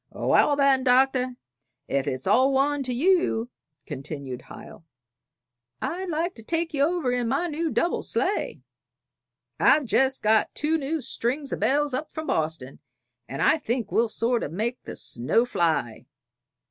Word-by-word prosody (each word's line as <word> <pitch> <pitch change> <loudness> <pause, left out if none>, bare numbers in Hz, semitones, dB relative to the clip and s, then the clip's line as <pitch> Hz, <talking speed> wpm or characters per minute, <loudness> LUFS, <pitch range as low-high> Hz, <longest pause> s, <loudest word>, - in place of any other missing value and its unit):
"Wal, 290 - +2
then, 275 -2 +3
Doctor 255 0 +3 0.5
ef 140 -1 -1
it's 130 +1 -3
all 265 +2 +4
one 280 +2 +1
to 260 -2 -3
you," 255 -5 +1 0.3
continued 135 -2 -7
Hiel, - - -11 1.0
"I'd 365 +2 -3
like 335 +3 -1
to 225 - -10
take 330 +6 -2
ye 280 - 0
over 320 -3 +1
in 245 -1 0
my 275 +9 0
new 330 0 -2
double 345 - 0
sleigh. 395 +3 -2 1.0
I've 300 - +4
jest 265 +2 +2
got 215 0 +2
two 315 +2 0
new 305 +2 -2
strings 265 +4 -2
o' - - -2
bells 290 0 +1
up 275 +4 -3
from 315 0 -5
Boston, 155 - -2 0.5
and 135 - -2
I 315 - +4
think 240 -3 -3
we'll 230 0 +2
sort 235 +2 0
o' - - -3
make 225 - -3
the - - -7
snow 145 - +1
fly. 160 - -1
260 Hz, 155 wpm, -25 LUFS, 225-300 Hz, 1.0 s, all